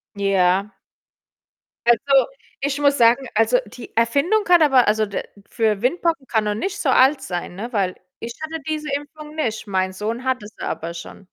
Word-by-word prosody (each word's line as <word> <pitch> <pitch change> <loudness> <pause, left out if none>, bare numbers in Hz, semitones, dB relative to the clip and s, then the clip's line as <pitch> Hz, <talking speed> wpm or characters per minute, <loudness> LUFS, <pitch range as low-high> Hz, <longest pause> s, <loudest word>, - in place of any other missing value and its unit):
Ja. 195 0 +1 1.1
Also, 265 +4 +4 0.3
ich 280 +1 -1
muss 285 -1 +3
sagen 240 +3 +4
also, 225 +3 +4
die 230 +3 -12
Erfindung 280 - +2
kann 350 -2 +5
aber 270 -5 +5
also, 215 +1 +2
d 200 - -4 0.3
für 220 -4 0
Windpocken 325 +2 0
kann 220 -3 0
noch 210 - 0
nicht 375 - -3
so 285 - 0
alt 265 +2 +4
sein, 175 -6 -5
ne, 230 +6 -6
weil 190 -4 0 0.2
ich 235 +1 -6
hatte 320 0 -5
diese 305 -1 -3
Impfung 300 +1 -8
nicht, 225 -8 -2
mein 190 -1 0
Sohn 220 +6 -4
hat 260 -2 -1
es 205 - -12
aber 165 +1 -4
schon. 170 - -10
240 Hz, 175 wpm, -21 LUFS, 210-285 Hz, 1.1 s, kann